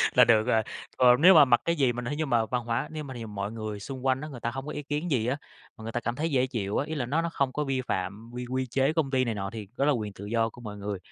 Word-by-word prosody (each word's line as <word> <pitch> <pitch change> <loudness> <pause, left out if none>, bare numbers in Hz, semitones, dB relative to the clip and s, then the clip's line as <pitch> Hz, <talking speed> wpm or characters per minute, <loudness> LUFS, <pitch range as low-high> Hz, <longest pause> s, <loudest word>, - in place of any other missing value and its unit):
là - - +8
được 110 -2 +5
rồi. 115 -3 +3 0.3
Còn 125 +1 +6
nếu 185 +3 +8
mà 155 - +9
mặc 120 -3 +4
cái 170 0 +1
gì 135 -5 +3
mà 125 - -5
nếu 125 +4 -3
như 155 +1 -1
mà 120 -4 +2
văn 120 0 -2
hóa 115 0 -1
nếu 155 -1 -5
mà 130 -2 -8
thí 120 - -7
dụ 115 - -5
mọi 105 0 -4
người 110 -2 -5
xung 130 +4 -6
quanh 130 0 +2
á, 155 - -6
người 130 -5 -9
ta 120 - -1
hông 135 +3 -6
có - - -4
ý 150 - -5
kiến 150 +4 -3
gì 120 -6 +1
á, 130 +3 0 0.4
mà 110 - -12
người 115 +1 -5
ta 120 - -1
cảm 120 0 -3
thấy 160 +3 -1
dễ 130 -2 +2
chịu 105 -6 -2
á, 140 - -1
ý 160 - -4
là 130 -6 -2
nó 155 +6 +1
nó 170 - -1
không 135 -4 0
có 150 - -1
vi 135 -2 -1
phạm 100 -1 -4
quy 125 0 -5
quy 130 0 -1
chế 135 +4 +1
công 160 -4 0
ty 130 -1 +2
này 115 -3 -2
nọ 100 -1 -4
thì 110 -3 -7
đó 140 - +1
là 150 - +4
quyền 105 -5 -3
tự 100 - -10
do 115 +1 +1
của 120 - -13
mọi 105 -3 -7
người, 100 -1 -4
125 Hz, 345 wpm, -28 LUFS, 110-140 Hz, 0.4 s, mà